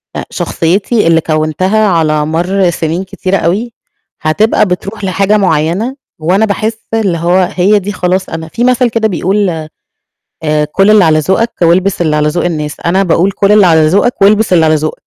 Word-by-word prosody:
آآ، - - -4
شخصيتي 195 +4 -1
اللي 165 -1 +3
كوّنتها 175 +8 0
على 155 -4 +1
مَرّ 175 +4 0
سنين 165 +2 -3
كتيرة 190 0 -2
أوي 215 +8 -2 0.5
هتبقى 210 +8 +1
بتروح 195 +3 -5
لحاجة 195 +2 +1
معيّنة، 185 - 0 0.2
وأنا 185 +7 +1
باحس 220 +2 -2 0.2
إن 205 -6 0
هو 175 +2 +1
هي 200 +3 +3
دي 200 +2 -5
خلاص 185 0 -2
أنا 160 0 -6
في 230 +9 -4
مثل 250 -1 +2
كده 220 -1 0
بيقول 195 +1 -1 0.9
آآ 150 -1 0
"كُل 195 +2 +3
اللي 210 -3 +5
على 155 -1 +3
ذوقك، 190 +9 0
والبس 180 +2 +2
اللي 155 -2 0
على 150 0 +1
ذوق 170 +3 -2
الناس". 150 -4 -3
أنا 190 +3 +2
باقول: 180 +2 +1
"كُل 200 +2 +1
اللي 210 -3 +5
على 160 -2 +4
ذوقك، 200 +6 +1
والبس 210 0 +3
اللي 165 -3 +4
على 155 - +3
ذوقك." 155 0 -3
185 Hz, 180 wpm, -11 LUFS, 160-205 Hz, 0.9 s, اللي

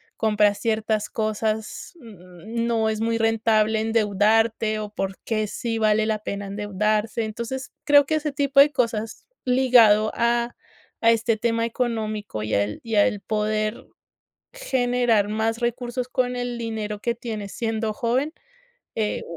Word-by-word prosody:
compras 210 -2 +2
ciertas 220 -1 -1
cosas, 215 - -3
mm, 215 - -7
no 225 -2 +1
es 220 0 -2
muy 230 0 +1
rentable 220 -1 +2
endeudarte, 220 0 +2
o 210 -1 -5
por 195 -1 -3
qué 215 -2 -1
sí 225 +2 -3
vale 215 0 +3
la 215 -1 0
pena 200 -1 -5
endeudarse. 210 +2 -1
Entonces, 235 +4 -5
creo 285 -1 +6
que 315 - 0
ese 300 -1 -1
tipo 275 0 +2
de 295 +1 +5
cosas 225 -4 -2 0.2
ligado 240 -5 +5
a 235 0 +1 0.5
a 230 0 +6
este 230 0 +1
tema 230 +1 0
económico 220 - -3
y 110 - -3
al 100 +1 -1
y 225 -2 -3
al 205 0 +3
poder 215 0 -2 0.7
generar 245 - +1
más 225 +2 -1
recursos 245 +1 -3
con 250 -1 0
el 245 -1 -3
dinero 215 -2 -4
que 235 +2 -1
tienes, 220 -4 -6
siendo 225 -2 -2
joven, 255 +8 -1 0.6
eh, 215 -1 -2
225 Hz, 145 wpm, -23 LUFS, 215-235 Hz, 0.7 s, creo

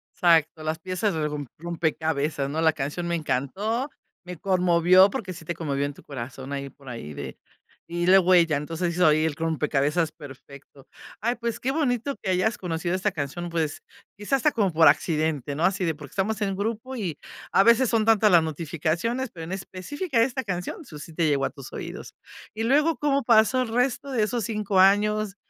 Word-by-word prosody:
Exacto, 160 -2 +3
las 155 +1 -2
piezas 185 +4 -1
de 155 -1 0
rom 145 -2 -5
rompecabezas, 160 -3 -1
¿no?, 160 +3 -2
la 160 - +5
canción 150 +4 -4
me 170 - 0
encantó, 195 - -2 0.3
me 180 -1 -8
conmovió 185 +1 +4
porque 195 -2 -5
sí 165 - -11
te 170 +1 -4
conmovió 140 -4 -2
en 145 0 -5
tu - - -16
corazón 135 0 -7
ahí 140 0 -4
por 135 0 -20
ahí 115 -12 -7
de - - -7 0.5
y 175 +1 -2
la 190 +1 +7
huella. 175 -4 +4
Entonces 165 +3 -3
hizo 180 -1 +3
ahí 155 +1 +4
el 160 -3 -1
rompecabezas 155 0 0
perfecto. 140 -2 -13 0.3
Ay, 235 +3 0
pues 235 -1 -4
qué 260 - -1
bonito 275 -3 -1
que 190 - -2
hayas 205 +6 +1
conocido 175 -1 -2
esta 195 +2 0
canción, 170 +3 -4
pues 160 -3 -2 0.3
quizás 205 +6 0
hasta 300 +3 +2
como 205 -5 +1
por 160 0 +5
accidente, 155 -4 +1
no 160 - +1
así 190 0 +1
de 165 -2 +1
porque 150 -2 -12
estamos 215 +3 -1
en 195 -2 0
grupo 225 +5 -3
y 180 - -4 0.3
a 195 - +5
veces 235 +2 +5
son 225 -2 +2
tantas 220 -2 +4
las 170 - +7
notificaciones, 165 - -2
pero 165 -2 -8
en 165 - -7
específica 230 - -2
esta 260 +2 0
canción, 180 - -4
eso 160 - -11
sí 165 - -10
te 165 0 +1
llegó 140 -2 +1
a - - -1
tus 140 - -12
oídos. - - -7 0.4
Y 220 - -3
luego, 295 +7 +3
¿cómo 280 -2 +1
pasó 230 +2 +4
el 250 - -5
resto 250 +4 0
de 225 -4 +1
esos 230 0 -1
5 210 -3 0
años?, 205 +1 +3
175 Hz, 200 wpm, -25 LUFS, 155-215 Hz, 0.5 s, la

